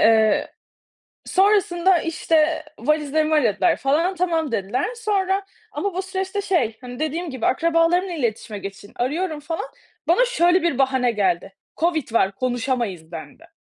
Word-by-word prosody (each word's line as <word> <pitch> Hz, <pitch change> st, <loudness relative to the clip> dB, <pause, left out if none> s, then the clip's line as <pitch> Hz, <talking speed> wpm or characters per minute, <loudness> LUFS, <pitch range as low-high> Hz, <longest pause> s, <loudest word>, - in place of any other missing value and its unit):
Eee, 220 Hz, -1 st, +4 dB, 0.8 s
sonrasında, 380 Hz, -2 st, +3 dB
işte, 320 Hz, -1 st, +1 dB
valizlerimi 305 Hz, +1 st, +1 dB
aradılar 210 Hz, -9 st, +3 dB
falan, 320 Hz, +8 st, +1 dB
tamam, 330 Hz, -6 st, 0 dB
dediler 215 Hz, +5 st, -1 dB
sonra 400 Hz, -3 st, 0 dB, 0.3 s
ama 400 Hz, -2 st, -2 dB
bu 375 Hz, -, -1 dB
süreçte, 380 Hz, +1 st, -3 dB
şey, 315 Hz, -, 0 dB
hani, 245 Hz, -1 st, -9 dB
dediğim 315 Hz, +2 st, -2 dB
gibi, 260 Hz, -3 st, -3 dB
akrabalarınla 335 Hz, +4 st, +2 dB
iletişime 225 Hz, -7 st, -3 dB
geçin 195 Hz, +1 st, -9 dB
arıyorum 305 Hz, +5 st, -1 dB
falan, 325 Hz, +9 st, -4 dB, 0.4 s
bana 425 Hz, +9 st, +5 dB
şöyle 360 Hz, -7 st, +3 dB
bir 335 Hz, -6 st, 0 dB
bahane 260 Hz, -2 st, +2 dB
geldi: 195 Hz, -2 st, 0 dB, 0.2 s
Covid 320 Hz, -8 st, 0 dB
var 195 Hz, -4 st, +3 dB
konuşamayız, 235 Hz, -9 st, -2 dB
denildi. 165 Hz, -, -10 dB
310 Hz, 130 wpm, -22 LUFS, 240-355 Hz, 0.8 s, bana